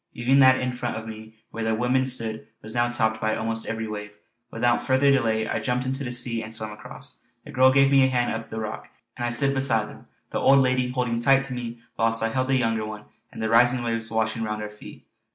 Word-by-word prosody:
Even 130 +3 +3
that 130 -1 +6
in 125 -1 -2
front 120 -1 -3
of 110 0 -6
me 110 0 -10 0.2
where 115 - -4
the 110 0 +1
women 125 +3 +1
stood 115 -4 -5 0.2
was 110 +1 -7
now 120 0 +1
topped 110 -2 0
by 110 0 0
almost 115 0 -3
every 115 0 -3
wave. 105 -1 -6 0.4
Without 120 +1 +1
further 135 +1 +3
delay 110 -5 +1
I 115 - -1
jumped 125 +3 -1
into 135 +2 -3
the 120 - -4
sea 120 -1 -1
and 110 0 -8
swam 110 -1 -5
across. 105 - -11 0.3
The - - -10
girl 130 +1 +5
gave 135 0 +4
me 135 -1 +6
a - - +5
hand 125 -3 0
up 115 0 -6
the 110 - -5
rock, 110 0 -6 0.3
and - - -5
I - - 0
stood 135 +4 +1
beside 130 -6 +1
them, - - -14 0.2
the - - -1
old 135 +1 +5
lady 130 -1 +2
holding 125 -2 -1
tight 135 +2 +4
to 135 -2 -5
me 120 -1 -6 0.2
whilst 115 0 +1
I 115 - +1
held 130 +2 -1
the 135 - +2
younger 115 -3 0
one 105 0 -7 0.3
and - - -6
the 110 - 0
rising 120 +2 +4
waves 115 -1 -2
washing 110 0 -1
round 105 -1 -3
our 105 - -6
feet. 105 - -13
115 Hz, 245 wpm, -25 LUFS, 110-130 Hz, 0.4 s, that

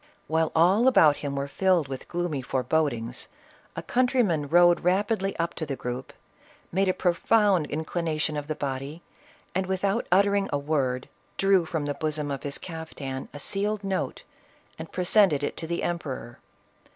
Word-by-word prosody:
While 160 0 +1
all 190 +9 +4
about 155 - +6
him 140 -1 -4
were 140 0 -2
filled 180 0 +2
with 135 -1 -7
gloomy 175 -5 -2
forebo 145 +5 +1
dings, 120 0 -6 0.5
a - - -5
countryman 240 - +1
rode 175 +2 +5
rapidly 195 +2 0
up 170 0 -1
to 160 - -4
the 140 - -2
group, 125 +1 -5 0.6
made 195 +2 +1
a - - +3
profound 185 0 +2
inclination 160 0 -2
of 145 -1 -4
the 155 - -2
body, 140 +4 -5 0.5
and, 190 +1 -1
without 190 +1 0
uttering 200 +1 +3
a 145 - +1
word, 140 -4 -1 0.3
drew 195 -3 +3
from 155 -2 -2
the 145 - -1
bosom 150 0 -2
of 140 - -4
his 140 -1 -4
caftan 155 -6 -7
a 145 - -9
sealed 205 +5 -1
note 195 -1 -2 0.6
and - - -8
presented 180 -5 +3
it - - -2
to 160 - -5
the 170 +1 -2
emperor. 135 -8 -4
160 Hz, 165 wpm, -26 LUFS, 145-190 Hz, 0.6 s, about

